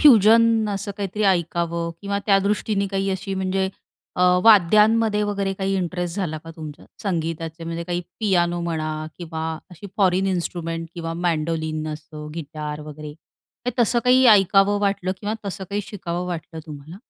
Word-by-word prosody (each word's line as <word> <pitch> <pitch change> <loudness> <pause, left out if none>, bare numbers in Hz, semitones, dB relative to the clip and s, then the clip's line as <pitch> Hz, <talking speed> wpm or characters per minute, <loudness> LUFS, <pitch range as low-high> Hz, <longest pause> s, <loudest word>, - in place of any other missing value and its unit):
Fusion 225 -3 +6
असं 200 0 -3
काहीतरी 205 +1 -3
ऐकावं 170 -2 0
किंवा 200 0 -1
त्यादृष्टीने 200 0 +2
काही 195 0 -1
अशी 190 +1 -3
म्हणजे 190 0 0 0.5
अ, - - -1 0.2
वाद्यांमध्ये 215 +1 +5
वगैरे 200 -2 -1
काही 195 0 -1
इंटरेस्ट 180 0 -2
झाला 165 -6 -2
का 165 +2 -11
तुमच्या 155 -2 -9 0.2
संगीताचे 165 -3 -3
म्हणजे 165 0 -4
काही 175 0 -2 0.2
पियानो 175 -4 +2
म्हणा 155 -2 -3
किंवा 160 -2 -5 0.3
अशी 180 +4 -10
फॉरन 190 -1 +3
इन्स्ट्रुमेंट 165 -2 -2
किंवा 165 -1 -4
मँडोलिन 160 -2 -1
असं 150 0 -9
गिटार 150 -2 -5
वगैरे 150 0 -8 0.5
काही 250 - -1
तसं. 235 +1 +2
काही 255 +1 +5
ऐकावं 200 -1 +5
वाटलं 195 -2 0
किंवा 210 +1 -2
तसं 195 0 -4
काही 205 +1 0
शिकावं 180 -3 -4
वाटलं 165 -2 -5
तुम्हाला? 150 +3 -9
180 Hz, 145 wpm, -23 LUFS, 165-200 Hz, 0.5 s, Fusion